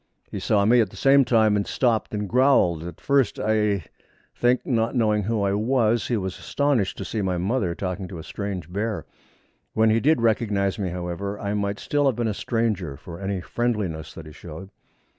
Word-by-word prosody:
He -, -, -4 dB
saw 100 Hz, -2 st, +2 dB
me 120 Hz, +3 st, +5 dB
at 105 Hz, -, 0 dB
the 95 Hz, -, -15 dB
same 135 Hz, +6 st, +5 dB
time, 110 Hz, -4 st, +3 dB
and 100 Hz, -1 st, -1 dB
stopped 115 Hz, -4 st, 0 dB
and 105 Hz, -1 st, -3 dB
growled. 125 Hz, -, +3 dB
At 85 Hz, +1 st, -8 dB
first, 140 Hz, -5 st, +1 dB
I 105 Hz, -3 st, +1 dB, 0.5 s
think, 125 Hz, +1 st, +2 dB
not 115 Hz, -1 st, 0 dB
knowing 105 Hz, -3 st, +2 dB
who 105 Hz, +1 st, -1 dB
I 100 Hz, 0 st, +1 dB
was, 115 Hz, +1 st, +1 dB
he 120 Hz, -, 0 dB
was 95 Hz, -2 st, -4 dB
astonished 140 Hz, -9 st, 0 dB
to -, -, -5 dB
see 110 Hz, -, -3 dB
my 95 Hz, -2 st, -1 dB
mother 95 Hz, -1 st, 0 dB
talking 95 Hz, 0 st, -4 dB
to 90 Hz, -, -8 dB
a 80 Hz, -, -8 dB
strange 95 Hz, -4 st, -5 dB
bear. 105 Hz, +2 st, -2 dB, 0.7 s
When 110 Hz, 0 st, +3 dB
he 110 Hz, -, +3 dB
did 155 Hz, +4 st, +3 dB
recognise 105 Hz, -4 st, +1 dB
me, 95 Hz, -3 st, -1 dB
however, 90 Hz, +3 st, -4 dB
I 100 Hz, -1 st, -2 dB
might 100 Hz, 0 st, -1 dB
still 145 Hz, +4 st, 0 dB
have 130 Hz, -, +2 dB
been 120 Hz, 0 st, -1 dB
a 110 Hz, -, 0 dB
stranger, 100 Hz, -, -1 dB
for 85 Hz, +3 st, -10 dB
any 95 Hz, -1 st, -3 dB
friendliness 105 Hz, -8 st, -2 dB
that 80 Hz, -, -9 dB
he 75 Hz, -, -10 dB
showed. 85 Hz, +5 st, -10 dB
105 Hz, 200 wpm, -24 LUFS, 95-115 Hz, 0.7 s, me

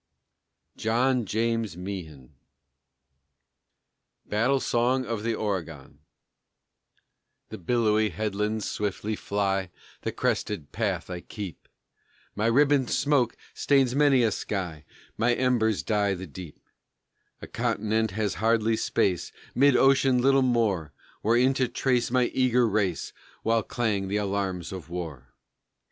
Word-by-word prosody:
JOHN 120 Hz, +2 st, +1 dB
JAMES 115 Hz, -4 st, -1 dB
MEEHAN. 80 Hz, -8 st, -7 dB, 1.9 s
BATTLE 125 Hz, +6 st, +1 dB
SONG 125 Hz, +2 st, +1 dB
OF 115 Hz, -3 st, -3 dB
THE 115 Hz, +1 st, -1 dB
OREGON 80 Hz, -10 st, -4 dB, 1.5 s
The -, -, -8 dB
billowy 110 Hz, +2 st, +2 dB
headlands 105 Hz, 0 st, -2 dB
swiftly 105 Hz, +1 st, -2 dB
fly 100 Hz, -2 st, -1 dB, 0.3 s
The -, -, -2 dB
crested 70 Hz, -, -2 dB
path 95 Hz, -6 st, -2 dB
I 90 Hz, -, -4 dB
keep, 100 Hz, -3 st, -8 dB, 0.7 s
My 105 Hz, +2 st, 0 dB
ribboned 140 Hz, +1 st, +3 dB
smoke 140 Hz, -5 st, +1 dB, 0.2 s
stains 135 Hz, -3 st, +2 dB
many 140 Hz, -3 st, +4 dB
a 110 Hz, -, +2 dB
sky, 90 Hz, -7 st, -4 dB, 0.3 s
My 120 Hz, +2 st, +3 dB
embers 120 Hz, -5 st, +1 dB
dye 105 Hz, -2 st, +1 dB
the 95 Hz, +1 st, -7 dB
deep; 85 Hz, 0 st, -10 dB, 0.8 s
A -, -, -8 dB
continent 110 Hz, +1 st, 0 dB
has 105 Hz, +1 st, -1 dB
hardly 115 Hz, 0 st, +2 dB
space 90 Hz, -5 st, 0 dB, 0.2 s
Mid 140 Hz, 0 st, +4 dB
ocean 135 Hz, -1 st, +4 dB
little 135 Hz, +2 st, +4 dB
more, 110 Hz, -, +1 dB, 0.3 s
Wherein 120 Hz, +4 st, +3 dB
to 130 Hz, -1 st, +1 dB
trace 125 Hz, 0 st, 0 dB
my 125 Hz, 0 st, +3 dB
eager 125 Hz, -2 st, +3 dB
race 100 Hz, -5 st, -1 dB, 0.3 s
While 115 Hz, 0 st, +2 dB
clang 105 Hz, -4 st, -1 dB
the 100 Hz, +2 st, -1 dB
alarums 95 Hz, -4 st, -2 dB
of 95 Hz, -3 st, -8 dB
war. 80 Hz, -8 st, -7 dB
110 Hz, 120 wpm, -26 LUFS, 95-120 Hz, 1.9 s, many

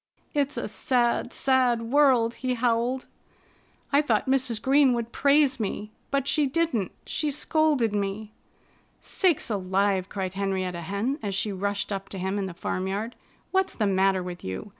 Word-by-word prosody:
"It's 285 Hz, 0 st, 0 dB
a -, -, -2 dB
sad, 245 Hz, -2 st, 0 dB
sad 255 Hz, -3 st, +2 dB
world!" 245 Hz, -2 st, +3 dB
he 255 Hz, -1 st, 0 dB
howled. 245 Hz, +2 st, 0 dB, 0.9 s
"I 285 Hz, -, +6 dB
thought 230 Hz, -8 st, +1 dB
Mrs. 260 Hz, -4 st, +1 dB
Green 270 Hz, +2 st, +4 dB
would 235 Hz, -1 st, -3 dB
praise 280 Hz, -1 st, +3 dB
me. 210 Hz, 0 st, -3 dB, 0.2 s
But 275 Hz, -1 st, 0 dB
she 300 Hz, -2 st, +2 dB
didn't. 275 Hz, -, 0 dB
She 305 Hz, -, -1 dB
scolded 295 Hz, -5 st, +1 dB
me!" 205 Hz, +1 st, -3 dB, 0.7 s
"Sakes 345 Hz, -, +1 dB
alive!" 190 Hz, -1 st, 0 dB
cried 190 Hz, -2 st, -4 dB
Henrietta 190 Hz, -3 st, -2 dB
Hen 200 Hz, -, -2 dB
as 200 Hz, -3 st, -3 dB
she 205 Hz, +2 st, 0 dB
rushed 200 Hz, +2 st, -2 dB
up 195 Hz, 0 st, -4 dB
to 195 Hz, -, -7 dB
him 190 Hz, +2 st, -2 dB
in 195 Hz, -, -2 dB
the 180 Hz, -, -8 dB
farmyard. 195 Hz, +7 st, -3 dB, 0.4 s
"What's 380 Hz, 0 st, +1 dB
the 215 Hz, -, 0 dB
matter 190 Hz, -1 st, +2 dB
with 180 Hz, -1 st, -7 dB
you? 95 Hz, -, -5 dB
230 Hz, 160 wpm, -26 LUFS, 195-270 Hz, 0.9 s, I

